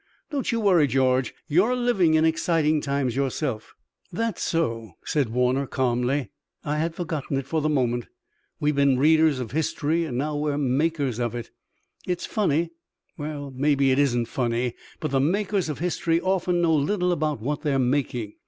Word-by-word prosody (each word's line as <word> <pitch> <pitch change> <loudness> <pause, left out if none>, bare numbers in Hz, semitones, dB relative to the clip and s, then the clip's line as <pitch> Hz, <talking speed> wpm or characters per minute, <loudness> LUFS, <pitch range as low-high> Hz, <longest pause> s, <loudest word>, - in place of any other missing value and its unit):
Don't 280 -4 -1
you 230 - 0
worry, 180 -8 +4
George. 130 -1 +2 0.2
You're 190 +11 +3
living 200 -10 +2
in 160 0 +4
exciting 160 -1 +2
times 140 -4 -1
yourself." 135 -4 -2 0.4
"That's 225 +2 -2
so," 115 - -1
said 145 -6 0
Warner 125 +3 +1
calmly. 125 -1 0 0.3
"I 150 +1 -1
had 165 +1 -1
forgotten 155 -5 -3
it 135 - -3
for 155 +3 -1
the 155 - +1
moment. 120 -5 0 0.5
We've 150 0 +1
been 140 -2 +3
readers 155 0 +4
of 120 -4 -5
history 160 +2 0
and 125 -6 -4
now 150 +3 -1
we're 145 -1 -1
makers 140 -2 0
of 120 -1 -1
it. 120 - -6 0.6
It's 180 -1 -2
funny 170 -6 0 0.5
and 145 -2 -5
maybe 140 0 +2
it 130 - +2
isn't 120 -4 +2
funny 120 0 -1 0.3
but 155 - -3
the 135 - +2
makers 190 +4 0
of 150 - -3
history 165 -1 0
often 180 -1 0
know 165 -1 +3
little 180 +5 +1
about 155 -5 -1
what 145 +6 -3
they're 145 -2 +1
making. 125 -4 0
145 Hz, 170 wpm, -25 LUFS, 130-165 Hz, 0.6 s, worry